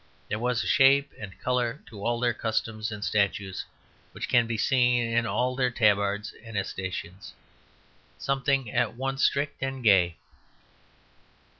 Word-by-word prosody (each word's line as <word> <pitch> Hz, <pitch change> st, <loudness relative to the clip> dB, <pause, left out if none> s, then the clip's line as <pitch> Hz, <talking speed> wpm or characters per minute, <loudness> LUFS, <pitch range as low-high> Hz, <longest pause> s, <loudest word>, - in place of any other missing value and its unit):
There 105 Hz, -, -2 dB
was 125 Hz, 0 st, 0 dB
a -, -, -4 dB
shape 140 Hz, +1 st, +5 dB
and 100 Hz, -4 st, -9 dB
colour 125 Hz, +1 st, -1 dB
in -, -, -12 dB
all 120 Hz, +3 st, -1 dB
their 120 Hz, -1 st, +1 dB
customs 110 Hz, 0 st, -2 dB
and 105 Hz, -1 st, -5 dB
statutes 100 Hz, -2 st, -1 dB, 0.5 s
which -, -, -5 dB
can 120 Hz, -2 st, +4 dB
be 115 Hz, -1 st, -2 dB
seen 125 Hz, 0 st, +3 dB
in 115 Hz, 0 st, +1 dB
all 125 Hz, +2 st, 0 dB
their 125 Hz, -1 st, +1 dB
tabards 105 Hz, -3 st, +1 dB
and 115 Hz, -3 st, -7 dB
escutcheons; 95 Hz, -1 st, -5 dB, 0.8 s
something 135 Hz, -3 st, 0 dB
at 120 Hz, -2 st, 0 dB
once 135 Hz, +2 st, -2 dB
strict 140 Hz, 0 st, +1 dB
and 135 Hz, -1 st, -3 dB
gay. 90 Hz, -6 st, +4 dB
115 Hz, 145 wpm, -27 LUFS, 105-125 Hz, 0.8 s, shape